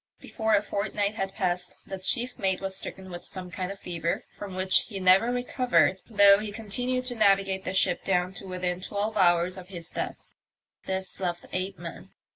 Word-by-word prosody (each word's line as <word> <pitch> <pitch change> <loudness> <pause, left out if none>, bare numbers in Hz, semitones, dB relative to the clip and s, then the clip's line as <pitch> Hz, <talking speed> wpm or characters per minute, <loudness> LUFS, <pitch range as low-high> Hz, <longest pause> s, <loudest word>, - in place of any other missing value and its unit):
Before 220 -2 0
a 205 - +2
fortnight 205 0 -1
had 195 -2 -3
passed 180 -1 -2
the 190 - -6
chief 245 +6 0
mate 190 -2 +1
was 195 0 -1
stricken 190 0 -2
with 175 0 -7
some 185 -1 -6
kind 185 +1 -3
of 195 - -8
fever, 170 -1 -3
from 200 -2 -7
which 185 0 +3
he 200 -4 -5
never 190 +6 +5
recovered, 245 -5 +2
though 200 -2 +7
he 210 -1 -3
continued 245 +4 -2
to 250 - -3
navigate 195 -3 +2
the 185 - -2
ship 180 -2 +2
down 180 -1 +1
to 195 - -8
within 180 -1 -2
twelve 205 +3 -2
hours 180 -1 +3
of 180 - -11
his 175 -3 -7
death. - - -4 0.6
This 190 -1 -2
left 175 -2 -2
eight 185 +1 -2
men. - - -9
190 Hz, 190 wpm, -27 LUFS, 185-205 Hz, 0.6 s, though